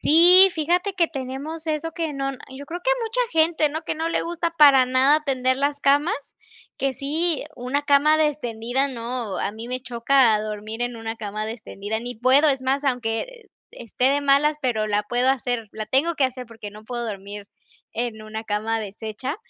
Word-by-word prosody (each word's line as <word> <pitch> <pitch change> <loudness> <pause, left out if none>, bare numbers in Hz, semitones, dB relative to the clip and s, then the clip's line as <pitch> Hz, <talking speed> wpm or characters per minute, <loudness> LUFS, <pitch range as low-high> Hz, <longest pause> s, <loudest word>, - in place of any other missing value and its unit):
Sí, 355 +5 +7
fíjate 355 +5 0
que 345 -3 +2
tenemos 280 +3 -6
eso 315 +1 -2
que 325 -2 -3
no 275 0 -2 0.2
yo 270 +2 -9
creo 345 +4 -6
que - - +1
mucha 450 -8 +2
gente, 320 -2 +1
¿no?, 315 +3 -5
que - - -3
no 320 +1 -2
le - - 0
gusta 340 0 -2
para 285 -5 +6
nada 265 +4 +3
tender 260 -2 0
las 285 +1 -1
camas. 285 +5 +3 0.6
Que 275 -1 -1
sí, 310 +5 0
una 255 +4 -2
cama 290 +2 +4
destendida, 265 -4 0
no, 235 -4 -4
a 200 - -2
mí 225 +3 -9
me 255 0 -3
choca 240 -2 +2
dormir 215 +2 -5
en 245 -1 -3
una 225 0 -5
cama 215 0 -5
destendida. 220 -1 -5
Ni 245 0 -6
puedo, 260 +6 +4
es 270 -2 0
más, 275 +2 0
aunque 245 -4 0 0.5
e - - -11
esté 250 +3 +1
de 285 +1 +1
malas, 285 +2 +3
pero 235 -5 0
la 205 0 +1
puedo 245 +4 +1
hacer, 245 -4 -2
la 215 -1 -6
tengo 305 +8 +1
que 280 - +2
hacer 255 -1 -3
porque 220 -2 -10
no 215 +1 -13
puedo 240 0 -4
dormir 200 0 -7 0.5
en 230 -1 -3
una 215 0 -6
cama 220 +1 -2
deshecha. 220 +6 -6
260 Hz, 190 wpm, -23 LUFS, 225-300 Hz, 0.6 s, Sí